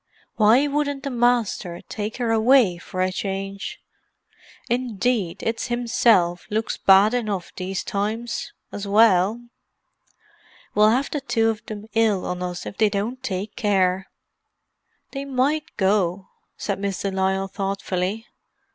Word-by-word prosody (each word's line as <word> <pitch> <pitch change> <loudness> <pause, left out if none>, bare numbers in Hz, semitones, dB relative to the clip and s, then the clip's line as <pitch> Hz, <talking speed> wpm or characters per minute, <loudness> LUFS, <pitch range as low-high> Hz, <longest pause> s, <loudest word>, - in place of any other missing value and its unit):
"Why 225 +6 +5
wouldn't 285 -1 -1
the 280 - -3
Masther 235 -8 +1
take 215 +1 -4
her 240 -3 0
away 225 -5 +4
for 185 +1 -5
a 185 0 +1
change? 195 - -4 0.9
Indeed, 235 -5 -1
it's 225 +2 -2
himself 230 -7 +2
looks 220 +1 -1
bad 195 +3 +5
enough 210 -7 -2
these 185 0 -3
times, 220 +4 -3 0.2
as 205 0 -5
well. 205 0 +4 1.3
We'll 210 +1 +5
have 255 +5 +1
the 295 - -2
two 225 -5 +1
of 220 0 -8
them 210 -1 -7
ill 220 -4 +2
on 180 0 -3
us 180 -1 -4
if - - -8
they 215 -1 +4
don't 215 +6 -3
take 205 -3 -4
care." 190 -4 +1 1.0
"They 275 0 -4
might 280 +3 -1
go," 190 -2 +1 0.3
said 200 -2 -3
Miss 195 -1 -3
de 200 - -1
Lisle 190 0 0
thoughtfully. 195 +2 -2
210 Hz, 135 wpm, -23 LUFS, 190-240 Hz, 1.3 s, Why